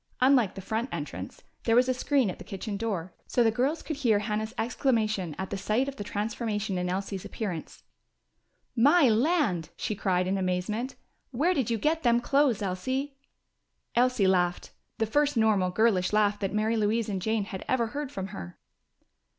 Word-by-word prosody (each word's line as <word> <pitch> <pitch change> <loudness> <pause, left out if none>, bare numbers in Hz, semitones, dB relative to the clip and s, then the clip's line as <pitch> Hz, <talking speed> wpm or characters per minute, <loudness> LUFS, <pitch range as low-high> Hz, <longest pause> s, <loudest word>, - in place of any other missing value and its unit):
Unlike 255 -6 +4
the 195 - -6
front 220 +6 -2
entrance, - - -6 0.2
there 230 - +3
was 250 +1 +5
a 255 - +2
screen 255 -4 +1
at - - -11
the - - -8
kitchen 200 +1 -5
door, 195 -5 -3
so 245 - +2
the 225 - +4
girls 265 +8 0
could 310 - -4
hear 235 -7 +3
Hannah's 215 +1 -2
exclamation 215 - 0
at 190 - -5
the 200 - -3
sight 220 +7 +1
of 275 - -5
the 205 - -4
transformation 210 -1 -2
in 180 0 -1
Elsie's 195 +1 -3
appearance. 185 -8 -5 0.9
"My 285 +5 +5
land!" 225 - +2
she - - -2
cried 185 -2 +1
in 195 +1 0
amazement. 190 +7 -2 0.3
"Where 305 +9 +1
did 265 -9 0
you 230 - +1
get 315 +8 +1
them 240 -3 +4
clothes, 260 -4 +2
Elsie?" 260 +10 -2 0.8
Elsie 245 -4 +3
laughed; 180 -2 +1 0.3
the 225 - +1
first 290 +4 +1
normal, 210 -5 +3
girlish 195 -2 +2
laugh 205 -1 +3
that 195 -2 -2
Mary 215 +2 +1
Louise 215 +1 +1
and 195 -3 -3
Jane 220 +2 0
had 195 -2 -6
ever 250 -2 +2
heard 290 -1 -4
from 195 -6 -5
her. 90 - -8
220 Hz, 180 wpm, -28 LUFS, 195-255 Hz, 0.9 s, was